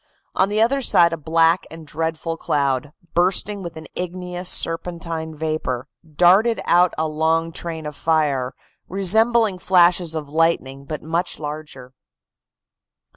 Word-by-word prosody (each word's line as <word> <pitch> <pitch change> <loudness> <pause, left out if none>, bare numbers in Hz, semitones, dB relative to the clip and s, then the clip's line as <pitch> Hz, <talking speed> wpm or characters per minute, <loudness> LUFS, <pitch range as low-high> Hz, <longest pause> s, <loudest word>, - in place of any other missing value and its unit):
On 190 +1 +2
the 210 +1 0
other 275 +4 +1
side 170 -8 +4
a - - 0
black 165 +2 +2
and 165 -1 -11
dreadful 160 +2 -3
cloud, 140 -3 -1 0.2
bursting 190 +3 +1
with 170 -3 -8
an 160 - -9
igneous 180 0 -4
serpentine 165 -2 0
vapor, 150 -5 -3 0.3
darted 195 +8 +4
out 175 +1 +3
a 160 0 0
long 160 +2 0
train 165 -1 -6
of 150 -1 -6
fire, 145 -6 0 0.3
resembling 215 +2 +2
flashes 175 -2 +3
of 155 -2 -4
lightning, 145 -3 0
but 155 +1 -6
much 165 +3 -2
larger. 150 -4 -8
165 Hz, 130 wpm, -21 LUFS, 155-180 Hz, 0.3 s, side